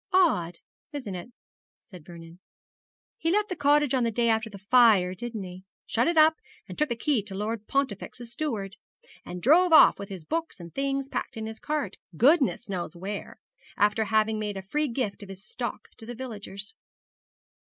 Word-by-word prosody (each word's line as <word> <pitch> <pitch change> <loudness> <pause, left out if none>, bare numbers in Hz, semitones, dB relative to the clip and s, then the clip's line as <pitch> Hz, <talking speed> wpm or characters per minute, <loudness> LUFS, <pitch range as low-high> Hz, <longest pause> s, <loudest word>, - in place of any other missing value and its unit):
'Odd, 240 - +3 0.4
isn't 255 -9 -5
it?' 180 +7 -7 0.6
said 180 -5 -11
Vernon. 170 0 -12 0.8
'He 330 - 0
left 420 +2 +1
the 365 - -2
cottage 295 -2 +3
on 255 -2 +2
the 230 - +2
day 235 +1 +1
after 225 0 +1
the 205 - -10
fire, 205 -3 +5
didn't 225 +1 -5
he? 185 0 -9 0.2
shut 235 +5 +1
it 340 -1 +1
up, 315 +1 +6 0.3
and - - -8
took 300 -1 +1
the 235 - -1
key 265 -1 +1
to 195 -1 -8
Lord 215 +1 -3
Pontifex's 245 -2 -2
steward, 225 -8 -3 0.5
and 180 0 -8
drove 345 +7 +5
off 315 - +8
with 200 - -7
his 190 -4 -7
books 330 - -3
and 170 -1 -10
things 275 0 -1
packed 270 - -4
in 220 - -4
his 220 0 -7
cart, 295 -10 -3 0.2
goodness 270 - +3
knows 180 -5 -4
where, 195 +4 -6 0.4
after 210 +2 +3
having 215 0 +2
made 210 -2 -3
a 190 - -6
free 300 +10 -1
gift 230 -6 -3
of 200 - -10
his 195 +1 -10
stock 240 +2 -5
to 225 - -11
the 240 - -6
villagers.' 210 -4 -6
225 Hz, 185 wpm, -27 LUFS, 195-275 Hz, 0.8 s, off